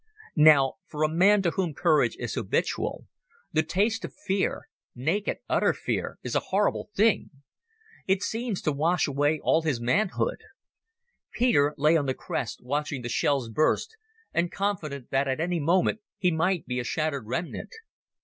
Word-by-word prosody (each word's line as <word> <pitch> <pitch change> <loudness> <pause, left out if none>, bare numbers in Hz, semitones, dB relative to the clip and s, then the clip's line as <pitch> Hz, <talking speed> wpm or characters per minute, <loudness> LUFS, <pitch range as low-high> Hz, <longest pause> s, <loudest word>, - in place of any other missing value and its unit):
Now, 145 -4 +6
for 150 0 -3
a - - +4
man 190 +6 +4
to 170 - +2
whom 170 -4 -2
courage 160 -2 +3
is - - -4
habitual, - - -2 0.5
the 155 - +3
taste 205 +8 0
of - - -7
fear—naked, 190 -2 -2
utter - - +2
fear—is - - -4
a - - +3
horrible 200 +2 +1
thing. 215 +1 +3 0.8
It 190 +1 +2
seems 225 -3 -3
to 155 - +1
wash 160 +5 +1
away 145 +2 +1
all 160 - +3
his 155 -7 -1
manhood. 195 - 0 0.9
Peter 150 - +2
lay 150 +3 +4
on 145 -3 -1
the 130 - 0
crest, 115 - -4
watching 145 0 -2
the 120 - -4
shells 135 0 +1
burst, 155 - +1 0.4
and 170 0 0
confident 155 -10 -3
that 135 +1 +1
any 175 +1 0
moment 175 +7 +2 0.2
he 185 -3 +2
might 170 +3 0
be 125 0 -2
a - - -2
shattered 140 -2 -2
remnant. 170 +9 -4
160 Hz, 150 wpm, -27 LUFS, 140-190 Hz, 0.9 s, Now